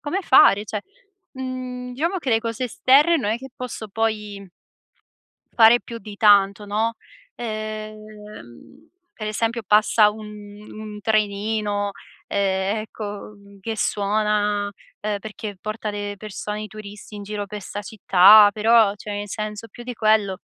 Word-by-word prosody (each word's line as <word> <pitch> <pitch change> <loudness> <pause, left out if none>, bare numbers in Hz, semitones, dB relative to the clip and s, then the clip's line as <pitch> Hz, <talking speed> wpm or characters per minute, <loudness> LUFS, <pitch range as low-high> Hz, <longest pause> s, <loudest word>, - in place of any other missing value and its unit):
come 350 +7 -2
fare 210 - +6
cioé, 210 -1 -4 0.5
mhmm, 255 -1 -6
diciamo, 335 +8 -1
che 270 -7 -3
le 225 0 +3
cose 230 +2 -3
esterne 275 +7 +4
non 225 -9 -1
è 225 - 0
che 265 +2 -10
posso 250 -3 -6
poi 210 -1 -3 1.1
fare 230 +1 +6
più 235 - -8
di 205 +1 -10
tanto, 205 -1 +4
no, 220 +3 -1 0.4
ehm, 215 - -8 0.3
per 215 -1 -6
esempio 225 +2 -1
passa 210 0 +5
un 215 0 -9 0.4
un 215 -1 -9
trenino, 210 -1 0 0.4
ehm, 195 +1 0
ecco, 210 -1 -7
mhmm, 200 -1 -18
che 225 +3 -4
suona, 205 0 0 0.3
ehm, 210 -1 -2
perché 210 -1 -7
porta 215 +1 -4
le 205 0 -4
persone 210 0 -6
e - - -5
i 215 - -7
turisti 210 0 -11
in 205 - -7
giro 205 0 -4
per 210 +1 -7
'sta 205 +1 -7
città, 205 +1 +6
però 220 -1 +4
cioè, 210 0 -8
in 205 0 -4
senso, 215 +2 -5
più 240 - -12
di 250 0 -5
quello 215 -4 +2
215 Hz, 150 wpm, -22 LUFS, 205-225 Hz, 1.1 s, fare